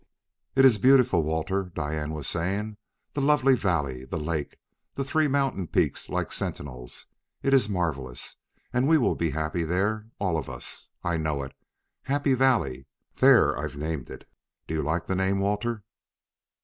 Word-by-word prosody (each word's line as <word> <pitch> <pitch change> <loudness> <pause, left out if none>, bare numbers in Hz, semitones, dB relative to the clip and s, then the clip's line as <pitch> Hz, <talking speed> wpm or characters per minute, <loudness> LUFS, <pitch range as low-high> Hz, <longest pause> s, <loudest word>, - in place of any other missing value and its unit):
"It 135 0 +6
is 115 -6 +6
beautiful, 125 -7 +5
Walter," 80 +5 -1
Diane 75 0 -2
was 75 -3 -5
saying: 100 +5 -2 0.4
"the 140 - -1
lovely 135 -2 +4
valley, 75 - -1
the 65 +5 -4
lake, 75 -1 -3 0.4
the 135 - -1
three 155 +2 +2
mountain 135 - 0
peaks - - 0
like - - -2
sentinels. 65 -3 -5 0.4
It 135 - +2
is 130 -6 +4
marvelous. 75 -10 -3 0.4
And 125 +2 +2
we 160 +1 +6
will 130 - +2
be 85 - -1
happy 80 +3 -1
there, 100 +6 0
all 90 -5 0
of 70 - -7
us, 65 -2 -7
I 85 -1 0
know 75 -3 -1
it.... 70 - -8 0.5
Happy 140 0 +1
Valley. 110 - +2 0.3
There - - +6
I've 75 - -5
named 75 -2 -4
it! - - -10 0.4
Do - - -5
you 80 - 0
like 80 +4 -1
the - - -1
name, 95 +1 +1
Walter?" 105 +2 -1
90 Hz, 160 wpm, -27 LUFS, 75-120 Hz, 0.5 s, It